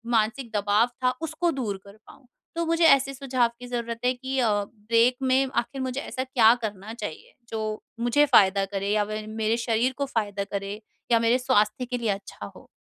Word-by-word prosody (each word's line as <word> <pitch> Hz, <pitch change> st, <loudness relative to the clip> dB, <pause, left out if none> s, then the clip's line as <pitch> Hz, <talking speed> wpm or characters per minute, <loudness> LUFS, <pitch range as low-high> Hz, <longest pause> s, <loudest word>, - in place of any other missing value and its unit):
मानसिक 225 Hz, +3 st, 0 dB
दबाव 205 Hz, +3 st, +3 dB, 0.2 s
था 250 Hz, -, +4 dB
उसको 340 Hz, +2 st, -1 dB
दूर 230 Hz, -9 st, -3 dB
कर 200 Hz, +1 st, -14 dB
पाऊँ, 255 Hz, -, -17 dB, 0.3 s
तो 335 Hz, 0 st, -1 dB
मुझे 330 Hz, +1 st, +2 dB
ऐसे 275 Hz, -2 st, +5 dB
सुझाव 255 Hz, -3 st, 0 dB
की 245 Hz, -, -9 dB
ज़रूरत 235 Hz, -1 st, -4 dB
है 250 Hz, -, +3 dB
कि 260 Hz, +1 st, -3 dB
अ, 235 Hz, -3 st, +3 dB
ब्रेक 230 Hz, +4 st, +1 dB
में 260 Hz, +1 st, +3 dB
आख़िर 265 Hz, +3 st, -2 dB
मुझे 260 Hz, +1 st, -3 dB
ऐसा 260 Hz, -, -4 dB
क्या 240 Hz, -4 st, +5 dB
करना 210 Hz, 0 st, -5 dB
चाहिए 475 Hz, -, -7 dB, 0.2 s
जो 220 Hz, -1 st, -3 dB, 0.4 s
मुझे 240 Hz, +5 st, +3 dB
फ़ायदा 195 Hz, -7 st, +4 dB
करे 195 Hz, 0 st, -3 dB
या 210 Hz, 0 st, +2 dB
व 215 Hz, 0 st, -3 dB
मेरे 220 Hz, +1 st, -1 dB
शरीर 235 Hz, +2 st, 0 dB
को 280 Hz, -, 0 dB
फ़ायदा 205 Hz, -6 st, -2 dB
करे 200 Hz, +2 st, -4 dB, 0.3 s
या 230 Hz, -, +5 dB
मेरे 230 Hz, +2 st, +3 dB
स्वास्थ्य 230 Hz, -2 st, +1 dB
के 245 Hz, 0 st, -3 dB
लिए 230 Hz, -3 st, -2 dB
अच्छा 195 Hz, -, -5 dB
हो? -, -, -15 dB
235 Hz, 195 wpm, -25 LUFS, 215-260 Hz, 0.4 s, ऐसे